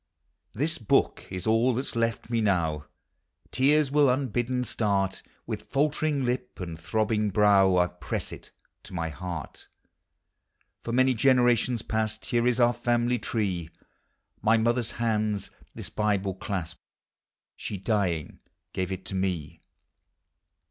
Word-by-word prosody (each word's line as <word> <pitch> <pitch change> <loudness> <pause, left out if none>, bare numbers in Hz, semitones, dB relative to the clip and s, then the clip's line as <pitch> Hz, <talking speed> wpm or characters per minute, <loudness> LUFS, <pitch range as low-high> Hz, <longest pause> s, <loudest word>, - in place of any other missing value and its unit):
This 155 +8 -1
book 110 - +1
is 90 -1 -5
all 115 +3 +3
that 130 - -1
's - - -2
loft 115 0 -1
me 115 -1 +1
now, 85 -8 0 0.3
— - - -39
Tears 140 +2 +3
will 145 -1 +5
unbidden 125 -1 0
start, 100 -5 0
— - - -37
With - - -6
faltering 150 -1 +1
lip 125 -1 -3
and 85 -3 -6
throbbing 105 +5 0
brow 100 -1 +5
1 90 -1 +3
press - - -3
it - - -10 0.3
to - - -11
my 80 -2 -2
heart. 85 -2 -7 1.2
For 115 - -4
many 130 +2 +4
generations 125 -1 +3
past 110 -1 -2
Here 120 0 +1
is 125 0 +2
our 120 0 +5
family 120 0 +1
tree; 95 -7 -2 0.7
My 110 +1 +4
mother's 120 +1 +1
hands 110 -3 -1 0.2
this - - -7
Bible 100 -2 0
clasped, 90 -3 -5 0.7
She, 100 - -5
dying, 95 -6 -1 0.3
gave 95 0 -2
it 95 +1 -6
me. 95 -5 -2
110 Hz, 135 wpm, -27 LUFS, 95-125 Hz, 1.2 s, will